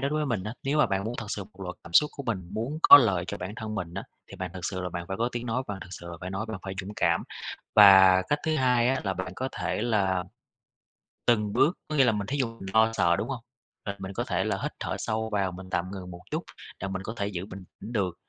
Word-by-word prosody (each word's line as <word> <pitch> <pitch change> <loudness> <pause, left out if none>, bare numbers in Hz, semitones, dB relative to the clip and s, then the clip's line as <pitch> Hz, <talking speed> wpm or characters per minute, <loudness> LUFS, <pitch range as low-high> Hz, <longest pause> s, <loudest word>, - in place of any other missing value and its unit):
đó 140 - 0
đối 150 - -1
với 150 - 0
mình 115 -7 -1
á, 105 - -4
nếu 145 +2 0
mà - - +5
bạn 100 0 -1
muốn 115 +2 -3
thật 110 - -4
sự 100 -2 -3
muốn - - -21
bộc 95 - -18
lộ 90 - -3
cảm 85 - -11
xúc 150 - +6
của 140 - -6
mình, 95 -6 -2
muốn 115 +9 -3
có - - +12
lợi 95 -9 +2
cho 100 - -4
bản 100 +2 -6
thân 110 -1 -5
mình 90 -4 -4
á, 100 - -4 0.3
thì - - -10
bạn 95 -1 -4
thực 90 -1 -6
sự 95 -1 -2
là 90 - -3
bạn 85 0 -5
phải 95 - -3
có 120 +3 +1
tiếng 120 0 -4
nói, 120 +3 0
bạn 100 -2 -4
thực - - -9
sự 85 -1 -9
là 85 - -7
phải 90 +1 -5
nói, 95 +3 -3
là - - -4
bạn 95 - -6
phải 95 0 -4
dũng 100 +3 -8
cảm. 85 -6 +2 0.5
Và 95 -2 +8
cách 145 - +2
thứ 155 -1 +2
2 125 -2 +3
á 135 0 +1
là 95 - 0
bạn 95 +1 -5
có 130 - -2
thể - - -2
là 95 -6 +1 1.0
từng 105 -3 +2
bước, 170 - +3
có 155 - -3
nghĩa 135 - +6
là 120 - +4
mình 105 -2 -3
thí 140 - -2
dụ, 130 -4 +1
mình 95 - -7
lo 110 0 +5
sợ, 85 -5 +3
đúng 110 - -2
hông? 125 -4 -4 0.4
Rồi 100 -1 -3
mình 95 0 -6
có - - -1
thể - - 0
là - - -1
hít - - -1
thở - - -3
sâu 110 0 -2
vào, 95 -2 +1
mình 95 +1 -10
tạm 90 +1 -1
ngừng 90 -2 -7
một 85 0 -10
chút, - - -1 0.4
là 95 - -3
mình 95 0 -4
có 110 - -5
thể 100 -2 -1
giữ 95 -2 -4
bình 95 -2 -9 0.2
tĩnh 115 - -7
được, 95 -6 0
100 Hz, 300 wpm, -27 LUFS, 95-120 Hz, 1.0 s, có